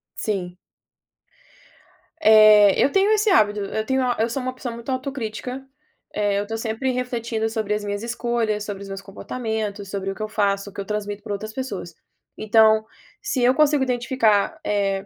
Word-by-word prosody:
Sim. 180 -4 -3 1.6
Eh, 215 -2 +7
eu 280 - +2
tenho 390 +2 +3
esse 430 0 +3
hábito. 210 - +3
Eu 215 +2 -3
tenho 265 0 +1
a 245 -1 0
eu 225 +2 +1
sou 265 +4 -3
uma 255 0 -3
pessoa 255 -2 -6
muito 235 +2 -9
autocrítica, 255 -1 -4 0.5
eh, 205 -1 0
eu 205 - -2
tô 225 +1 -3
sempre 225 +3 -2
refletindo 235 -3 -2
sobre 220 -2 -2
as 210 0 -2
minhas 205 +1 -4
escolhas, 235 -3 -1
sobre 200 -1 -6
os 195 - -10
meus 195 0 -6
comportamentos, 210 0 -5
sobre 195 -1 -3
o - - -7
que 215 - -10
eu 215 - -2
faço, 200 -2 0
o - - -17
que 200 - -5
eu 195 - -7
transmito 205 -1 -4
pra 205 - -4
outras 215 +2 -6
pessoas. 210 -10 -5 0.4
Então, 220 0 +4 0.4
se 420 -11 -2
eu 250 +1 +5
consigo 295 -1 +3
identificar, 245 -4 +1
eh, 195 -1 0
220 Hz, 185 wpm, -22 LUFS, 205-250 Hz, 1.6 s, Eh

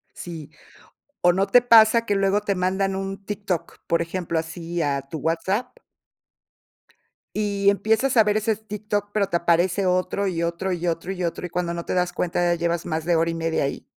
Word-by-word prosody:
Sí, 165 -4 -8 0.7
o 175 0 +5
¿no 195 +2 +1
te 245 +5 +6
pasa 230 -1 +6
que 205 - +1
luego 195 +1 +2
te 205 -1 -1
mandan 190 +1 0
un 195 0 -5
TikTok, 200 -4 -4
por 170 - +1
ejemplo, 170 -1 -3
así, 165 +1 -5
a 140 -2 0
tu 160 - -5
WhatsApp 190 - -1 1.6
y 200 -1 +1
empiezas 220 +6 +1
a 220 - +8
ver 210 0 +1
ese 215 0 +1
TikTok, 210 -1 -4
pero 205 -2 +1
te 175 - +1
aparece 175 +3 +2
otro, 185 +2 0
y 170 -3 -1
otro 170 +3 -2
y 175 0 -4
otro 170 +2 -2
y 185 - -5
otro, 170 +1 -3
y 180 - -6
cuando 175 0 -2
no 170 0 -5
te - - -3
das 180 -1 +1
cuenta, 175 0 -1
ya 175 0 +2
llevas 170 0 -1
más 160 -1 -3
de 175 - +2
hora 165 +1 +2
y 165 - -2
media 165 -2 -1
ahí? 140 - -4
185 Hz, 200 wpm, -23 LUFS, 170-200 Hz, 1.6 s, a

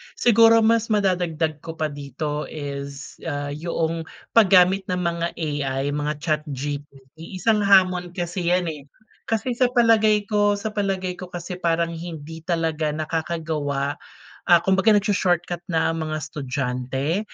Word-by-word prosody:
Siguro, 230 -1 +5
mas 230 0 +3
madadagdag 175 -7 0
ko 165 +1 -8
pa 155 -2 -2
dito 145 +1 -4
is, 140 -1 -7
ah, 145 -1 -3
'yong 165 +1 -2 0.2
paggamit 190 -3 +5
ng 180 0 -1
mga 170 -1 -1
AI, 145 -4 -2
mga 150 +1 -1
chatGPT. 145 +1 -5
Isang 215 +3 +2
hamon 180 -2 +4
kasi 175 0 -3
yan, 180 -2 +1
eh. 145 -2 -10 0.4
Kasi 230 +2 -1
sa 255 - +4
palagay 220 -3 +4
ko 205 -1 +3
sa 210 +2 -3
palagay 190 -3 -2
ko 185 - -7
kasi 175 +1 -5
parang 170 -1 +1
hindi 160 -1 -8
talaga 160 -3 -1
nakakagawa, 155 -2 -2 0.5
ah 175 -1 +7
kumbaga, 195 +3 +4
nag-sho-shortcut 175 -4 0
na 165 -1 +1
mga 155 -1 -3
estudyante, 135 +2 -2
165 Hz, 130 wpm, -23 LUFS, 150-190 Hz, 0.5 s, ah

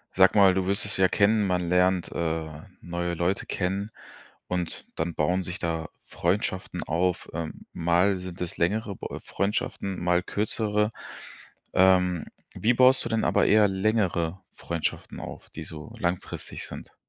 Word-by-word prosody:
Sag 95 +2 +6
mal, 100 -2 +7
du 95 0 0
wirst 100 +2 +2
es 100 - -1
ja 95 0 +5
kennen, 105 +2 +3
man 90 -2 0
lernt, 90 0 +2
äh, 80 -1 -1 0.3
neue 85 0 -3
Leute 90 +4 -1
kennen 100 +3 -1 0.6
und 90 -2 -3
dann 85 +1 -2
bauen 90 +5 +1
sich 90 0 -5
da 80 -2 -2 0.2
Freundschaften - - -1
auf. 90 +2 0
Ähm, 80 -1 -5
mal 90 +4 +3
sind 90 0 -8
es 90 -2 -4
längere 100 +3 0
b - - -6 0.2
Freundschaften, 100 -2 -2
mal 90 0 +2
kürzere. 105 +2 0 0.8
Ähm, 90 -2 +4 0.3
wie 115 - +2
baust 130 +2 +5
du - - -4
denn 115 -1 +1
aber - - +3
eher 105 -1 +5
längere 95 -4 0
Freundschaften 85 -2 -4
auf, - - -9
die - - -7
so 75 -2 -9
langfristig 90 +1 -3
sind? - - -10
90 Hz, 150 wpm, -27 LUFS, 85-100 Hz, 0.8 s, mal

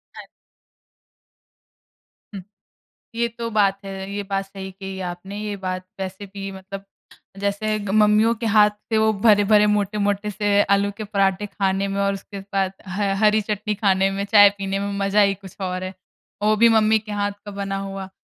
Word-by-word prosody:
हाँ। - - -9 2.1
हुँ। 195 - -6 0.7
ये 235 0 +1
तो 230 -1 -3
बात 200 -2 +2
है। 195 0 -6
ये 205 0 -3
बात 195 0 -2
सही 195 -1 -8
कही 190 0 -8
आपने। 190 +3 -8
ये 210 -1 -3
बात 185 0 -3
वैसे 190 +1 -5
भी 195 0 -6
मतलब 195 +1 -9 0.5
जैसे 205 +2 -1
ग 205 - -6
मम्मियों 210 +2 +4
के 230 +1 -5
हाथ 210 -1 +5 0.2
से 220 - +3
वो 220 0 +3
भरे-भरे, 210 0 +4
मोटे-मोटे 205 0 -1
से 205 0 +2
आलू 200 0 0
के 215 - -4
पराठे 200 -1 0
खाने 195 -1 -1
में 195 0 -3
और 200 0 +1
उसके 195 +1 -8
बाद 190 -1 +1 0.2
ह 195 +1 -1
हरी 215 0 +4
चटनी 210 0 -3
खाने 195 -1 +2
में, 200 +1 -2
चाय 205 -1 +7
पीने 195 0 -2
में 200 0 -3
मज़ा 195 +1 +3
ही 200 -1 +4
कुछ 195 -1 -13
और 185 0 -3
है। 185 +1 -5 0.5
और 210 - +1
वो 215 - +4
भी 230 +2 +5
मम्मी 220 0 +4
के 210 0 -10
हाथ 205 0 -1
का 205 - -7
बना 195 -1 -3
हुआ। 195 -1 -6
200 Hz, 185 wpm, -22 LUFS, 195-210 Hz, 2.1 s, चाय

